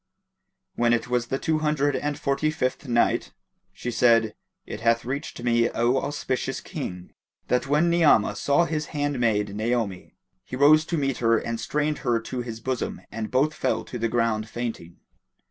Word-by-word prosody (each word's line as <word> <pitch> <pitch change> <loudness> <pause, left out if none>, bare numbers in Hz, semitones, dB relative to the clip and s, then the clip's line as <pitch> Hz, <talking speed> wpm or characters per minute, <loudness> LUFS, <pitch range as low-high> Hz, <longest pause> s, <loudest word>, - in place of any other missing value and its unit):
When 120 0 +2
it 120 0 -1
was 125 -1 0
the 135 - -1
Two 155 +2 0
Hundred 150 -2 +1
and 145 0 -2
Forty 140 +2 0
fifth 130 -2 -2
Night, 120 -1 +1 0.4
She 125 - -5
said, 115 -2 +3 0.3
It - - -6
hath 115 0 +2
reached 130 -1 -5
me, 120 -1 +3
O 120 +2 +1
auspicious 130 -2 -2
King, 90 0 -7 0.4
that 125 +1 +1
when 150 +4 +3
Ni'amah 150 -12 +4
saw 145 +10 +2
his 155 -2 -2
handmaid 120 -8 0
Naomi, 110 -4 -2 0.3
he - - -7
rose 150 +4 +5
to 170 - -2
meet 135 -4 0
her 115 -1 +3
and 115 -1 -3
strained 150 +5 -1
her 120 -1 +1
to 125 +2 -5
his 115 -2 -6
bosom 130 +1 -3
and 110 0 -4
both 145 +4 +2
fell - - -1
to 125 - -7
the 115 0 0
ground 115 -2 0
fainting. 115 -8 -5
125 Hz, 170 wpm, -25 LUFS, 115-145 Hz, 0.4 s, rose